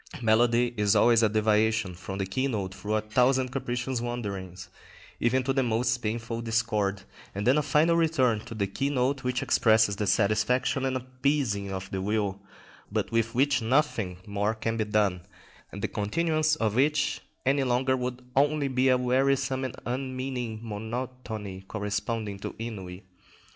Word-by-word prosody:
Melody 120 Hz, +1 st, +3 dB
is 105 Hz, -1 st, +3 dB
always 120 Hz, -1 st, +5 dB
a 110 Hz, -, +4 dB
deviation 110 Hz, -1 st, +2 dB
from 90 Hz, +2 st, -7 dB
the 95 Hz, -, -1 dB
keynote 100 Hz, -3 st, -2 dB
through 105 Hz, +2 st, -3 dB
a 110 Hz, -, +1 dB
thousand 125 Hz, +4 st, +2 dB
capricious 125 Hz, -1 st, -2 dB
wanderings, 100 Hz, -6 st, -5 dB, 0.5 s
even 130 Hz, +2 st, +2 dB
to 135 Hz, +1 st, 0 dB
the 135 Hz, -, +2 dB
most 115 Hz, -1 st, +1 dB
painful 115 Hz, +1 st, -3 dB
discord, 110 Hz, -4 st, 0 dB, 0.3 s
and 100 Hz, -, -3 dB
then 130 Hz, +3 st, +5 dB
a 150 Hz, -, +3 dB
final 150 Hz, +4 st, +3 dB
return 155 Hz, -9 st, +2 dB
to 115 Hz, -, -8 dB
the 100 Hz, -2 st, 0 dB
keynote 135 Hz, +5 st, -1 dB
which 125 Hz, 0 st, -1 dB
expresses 110 Hz, -3 st, +3 dB
the 105 Hz, -, -1 dB
satisfaction 125 Hz, +6 st, +2 dB
and 130 Hz, -1 st, 0 dB
appeasing 130 Hz, -5 st, -1 dB
of 95 Hz, 0 st, -5 dB
the 95 Hz, -, -2 dB
will, 100 Hz, -1 st, -1 dB, 0.5 s
but -, -, -1 dB
with 115 Hz, 0 st, 0 dB
which 140 Hz, +1 st, +3 dB
nothing 110 Hz, -, +1 dB
more 105 Hz, +1 st, -1 dB
can 115 Hz, +1 st, -2 dB
then 110 Hz, -1 st, -1 dB
be -, -, -11 dB
done, 100 Hz, -4 st, +2 dB, 0.5 s
and -, -, -8 dB
the -, -, +2 dB
continuance 155 Hz, +8 st, +1 dB
of 110 Hz, -8 st, 0 dB
which 145 Hz, +6 st, +1 dB, 0.2 s
any 135 Hz, +1 st, +3 dB
longer 130 Hz, +1 st, +2 dB
would 125 Hz, 0 st, -4 dB
only 145 Hz, +1 st, +3 dB
be 130 Hz, 0 st, +2 dB
a 130 Hz, -, +5 dB
wearisome 130 Hz, +1 st, +1 dB
and 130 Hz, -, -4 dB
unmeaning 130 Hz, -2 st, -3 dB
monotony 110 Hz, -2 st, -5 dB
corresponding 105 Hz, 0 st, -3 dB
to -, -, -6 dB
ennui. 95 Hz, -5 st, -7 dB
115 Hz, 160 wpm, -27 LUFS, 105-130 Hz, 0.5 s, always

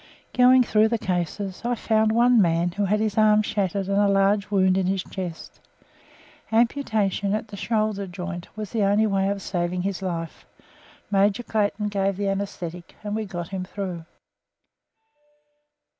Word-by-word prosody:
Going 255 Hz, 0 st, +6 dB
through 215 Hz, -1 st, +3 dB
the 230 Hz, +1 st, 0 dB
cases, 185 Hz, 0 st, -3 dB
I 240 Hz, +1 st, 0 dB
found 220 Hz, -1 st, +1 dB
one 240 Hz, 0 st, +5 dB
man 170 Hz, 0 st, +2 dB
who 205 Hz, +3 st, -1 dB
had 210 Hz, +2 st, +1 dB
his 215 Hz, -1 st, 0 dB
arm 215 Hz, 0 st, +5 dB
shattered 195 Hz, -2 st, -1 dB
and 200 Hz, 0 st, +1 dB
a 205 Hz, -, +4 dB
large 200 Hz, +1 st, +2 dB
wound 190 Hz, -2 st, +3 dB
in 190 Hz, -1 st, +1 dB
his 190 Hz, -1 st, 0 dB
chest. 180 Hz, -4 st, -7 dB, 0.9 s
Amputation 220 Hz, -4 st, +1 dB
at 215 Hz, 0 st, -4 dB
the 205 Hz, -, -8 dB
shoulder 215 Hz, -2 st, -1 dB
joint 180 Hz, -1 st, -6 dB
was 215 Hz, -2 st, -5 dB
the 225 Hz, -, -1 dB
only 205 Hz, +2 st, +3 dB
way 195 Hz, -2 st, +1 dB
of 200 Hz, -1 st, -3 dB
saving 180 Hz, 0 st, -2 dB
his 195 Hz, 0 st, -3 dB
life. 170 Hz, -3 st, -5 dB, 0.6 s
Major 200 Hz, +4 st, +2 dB
Clayton 210 Hz, -1 st, -1 dB
gave 195 Hz, -1 st, -1 dB
the 200 Hz, -1 st, -1 dB
anaesthetic, 180 Hz, -3 st, -5 dB
and 205 Hz, 0 st, -3 dB
we 220 Hz, 0 st, -2 dB
got 175 Hz, -3 st, -6 dB
him 190 Hz, -2 st, -4 dB
through. 185 Hz, -3 st, -6 dB
200 Hz, 160 wpm, -24 LUFS, 185-215 Hz, 0.9 s, Going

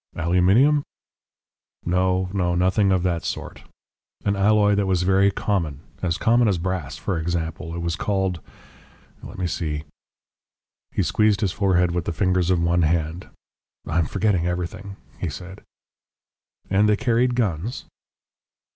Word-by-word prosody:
"Aluminium?" 95 Hz, -, +3 dB, 1.0 s
"No, 90 Hz, +1 st, +1 dB
no, 90 Hz, -3 st, 0 dB
nothing 95 Hz, +3 st, +2 dB
of 95 Hz, -2 st, +2 dB
that 85 Hz, -3 st, -1 dB
sort. -, -, -5 dB, 0.6 s
An 100 Hz, 0 st, +2 dB
alloy 105 Hz, +1 st, +3 dB
that 100 Hz, -1 st, +1 dB
was 90 Hz, -2 st, +1 dB
very 95 Hz, +2 st, +4 dB
common 85 Hz, -8 st, -2 dB, 0.2 s
as 85 Hz, -2 st, 0 dB
common 120 Hz, +1 st, +3 dB
as 100 Hz, -4 st, +2 dB
brass, 90 Hz, -4 st, -3 dB
for 90 Hz, -4 st, -2 dB
example. 80 Hz, 0 st, -3 dB
It 85 Hz, -, -4 dB
was 85 Hz, -1 st, -1 dB
called 95 Hz, 0 st, -1 dB, 0.8 s
let -, -, -10 dB
me 90 Hz, -, -2 dB
see 80 Hz, -4 st, -3 dB, 0.5 s
." -, -, -70 dB
He -, -, 0 dB
squeezed 105 Hz, -1 st, +2 dB
his 100 Hz, -4 st, +1 dB
forehead 90 Hz, -3 st, +2 dB
with 85 Hz, 0 st, -2 dB
the -, -, -2 dB
fingers 90 Hz, +1 st, +1 dB
of 90 Hz, -2 st, +3 dB
one 85 Hz, +1 st, +2 dB
hand. 80 Hz, +1 st, -1 dB, 0.6 s
"I 80 Hz, +2 st, 0 dB
am 80 Hz, -, +1 dB
forgetting 95 Hz, -5 st, 0 dB
everything," 90 Hz, +3 st, -4 dB, 0.2 s
he 90 Hz, -, -2 dB
said. 90 Hz, +7 st, -9 dB, 1.1 s
"And 100 Hz, +2 st, +3 dB
they 105 Hz, -, +3 dB
carried 120 Hz, +1 st, +1 dB
guns?" 105 Hz, -1 st, -2 dB
90 Hz, 145 wpm, -23 LUFS, 85-100 Hz, 1.1 s, very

